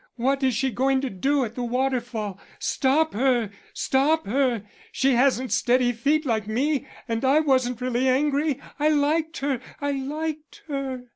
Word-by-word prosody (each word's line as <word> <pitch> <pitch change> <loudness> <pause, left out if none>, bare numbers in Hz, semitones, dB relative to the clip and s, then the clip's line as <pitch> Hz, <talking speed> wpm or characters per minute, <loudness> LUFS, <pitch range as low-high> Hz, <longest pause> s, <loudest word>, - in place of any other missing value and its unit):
What 270 +3 0
is 260 -3 +2
she 265 +3 0
going 265 +4 +2
to 270 - -3
do 270 +8 +1
at 220 - -7
the 245 - -5
waterfall? 240 -5 -2 0.2
Stop 300 +4 +1
her! 240 -2 +1 0.2
stop 300 +4 +1
her! 245 -1 +1 0.3
She 270 0 +2
hasn't 255 0 +2
steady 245 0 +3
feet 285 +7 +1
like 220 -5 -1
me, 275 +5 0 0.2
and 230 0 -2
I 270 +3 +4
wasn't 255 -5 +1
really 255 +1 +1
angry. 290 +1 +1 0.2
I 300 +1 +3
liked 310 +2 +1
her; 270 -3 -1 0.2
I 285 0 -1
liked 300 +3 -5
her." 270 -3 -4
265 Hz, 160 wpm, -24 LUFS, 245-285 Hz, 0.3 s, I